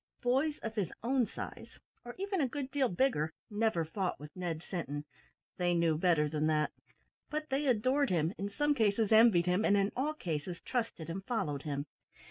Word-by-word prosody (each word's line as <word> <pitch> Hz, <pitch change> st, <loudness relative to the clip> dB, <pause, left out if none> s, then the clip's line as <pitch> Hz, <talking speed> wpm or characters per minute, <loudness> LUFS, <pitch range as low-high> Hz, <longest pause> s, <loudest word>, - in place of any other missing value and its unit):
Boys 270 Hz, +5 st, +2 dB
of 225 Hz, -, -3 dB
his 205 Hz, -6 st, -1 dB
own 250 Hz, -1 st, +2 dB
size, -, -, -8 dB, 0.3 s
or 240 Hz, -, -8 dB
even 390 Hz, -2 st, -1 dB
a 270 Hz, -, +2 dB
good 270 Hz, +1 st, -5 dB
deal 270 Hz, -3 st, +2 dB
bigger, 175 Hz, -, +1 dB, 0.2 s
never 210 Hz, -6 st, +1 dB
fought 180 Hz, +3 st, -2 dB
with 150 Hz, +1 st, -11 dB
Ned 175 Hz, -3 st, -3 dB
Sinton. 145 Hz, -5 st, -4 dB, 0.5 s
They 175 Hz, -1 st, +2 dB
knew 165 Hz, -2 st, +3 dB
better 160 Hz, -2 st, +3 dB
than 155 Hz, +1 st, 0 dB
that; 155 Hz, -1 st, +2 dB, 0.6 s
but 305 Hz, 0 st, -3 dB
they 275 Hz, +2 st, +1 dB
adored 260 Hz, +4 st, +3 dB
him, 165 Hz, 0 st, +1 dB
in 200 Hz, +1 st, -2 dB
some 295 Hz, +8 st, +1 dB
cases 220 Hz, -4 st, +2 dB
envied 220 Hz, -6 st, +6 dB
him, 180 Hz, +4 st, +2 dB
and 205 Hz, -1 st, +4 dB
in 200 Hz, +1 st, +2 dB
all 295 Hz, +4 st, 0 dB
cases 170 Hz, -, -3 dB
trusted 230 Hz, -10 st, -2 dB
and 185 Hz, +3 st, -4 dB
followed 170 Hz, -, -1 dB
him. 140 Hz, -1 st, -3 dB
200 Hz, 185 wpm, -33 LUFS, 165-255 Hz, 0.6 s, envied